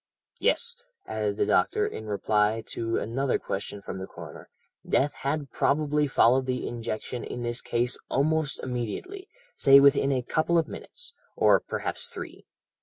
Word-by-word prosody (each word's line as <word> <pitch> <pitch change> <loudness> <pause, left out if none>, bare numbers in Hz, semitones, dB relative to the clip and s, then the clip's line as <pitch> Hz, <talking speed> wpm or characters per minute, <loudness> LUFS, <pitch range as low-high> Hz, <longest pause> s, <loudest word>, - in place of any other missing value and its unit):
"'Yes,' 475 0 +1 0.3
added 105 -2 -2
the - - +2
doctor - - +2
in 110 - -6
reply 105 +1 +1
to 115 0 -2
another 130 +4 0
question 100 +1 -5
from 95 - -6
the 95 - -6
coroner, - - -11 0.3
'death 145 +2 +1
had 140 -1 -3
probably 150 0 +1
followed 130 0 +4
the 125 -1 -2
injection 115 +1 -4
in 120 - -5
this 120 0 -1
case 120 +1 -1
almost 155 +1 +1
immediately; 130 - -4 0.3
say 140 0 +8
within 140 0 +5
a 130 -2 0
couple 160 +6 +1
of 165 -2 +2
minutes, - - -8 0.2
or - - +5
perhaps 480 - -4
three. 480 - -9
130 Hz, 150 wpm, -27 LUFS, 115-150 Hz, 0.3 s, say